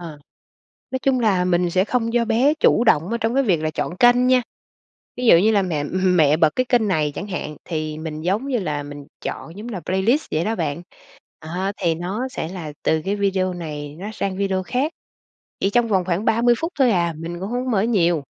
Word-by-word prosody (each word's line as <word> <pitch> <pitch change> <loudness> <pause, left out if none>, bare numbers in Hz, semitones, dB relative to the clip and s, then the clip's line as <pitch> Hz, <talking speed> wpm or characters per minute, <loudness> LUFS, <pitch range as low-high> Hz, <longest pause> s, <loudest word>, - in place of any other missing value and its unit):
À. 160 -4 -9 0.7
Nói 260 - -2
chung 265 -2 +2
là 195 -6 +2
mình 175 -1 +2
sẽ 185 +3 +2
không 235 -1 0
cho 240 -1 +2
bé 240 +6 +3
chủ 235 - +4
động, 175 -6 +3
ơ, 235 - 0
trong 225 +1 -1
cái 275 - +3
việc 180 -10 +1
là 155 - 0
chọn 175 +4 -4
kênh 245 +1 +5
nha. 255 0 +4 0.8
Ví 250 - -3
dụ 170 - +8
như 215 +5 +4
là 205 - +3
mẹ 155 -5 -2
mẹ 180 -4 +3
bật 160 -2 +4
cái 255 - +1
kênh 235 -4 +3
này 155 -5 +1
chẳng 200 - -5
hạn, 165 -6 -5
thì 155 -2 -3
mình, 155 -1 -6
giống 200 - -1
như 260 - 0
là, 150 -6 -3
mình 145 0 -9 0.2
chọn, 165 +4 -6
giống 220 +4 -7
là 205 -6 -4
playlist 210 +11 +1
vậy 160 +4 0
đó 225 +1 0
bạn. 160 -1 -2 0.6
À, 180 +5 -3
thì 170 -4 0
nó 195 +10 -3
sẽ 210 - -4
là 165 -5 -7
từ 160 0 +1
cái 200 - 0
video 190 -2 0
này 150 -4 -6
nó 205 +3 -5
sang 195 -3 -3
video 190 -1 0
khác, 265 - -1 0.7
chỉ 195 - +1
trong 235 +2 +2
vòng 190 -4 +1
khoảng 185 +4 -1
30 240 +2 +3
phút 330 +2 -3
thôi 255 -4 +5
à. 170 -3 +1
Mình 170 +2 -6
cũng 190 +3 -5
hông 245 +2 -2
có 255 - -1
mở 195 -4 +2
nhiều. 175 -9 +2
190 Hz, 230 wpm, -21 LUFS, 165-230 Hz, 0.8 s, dụ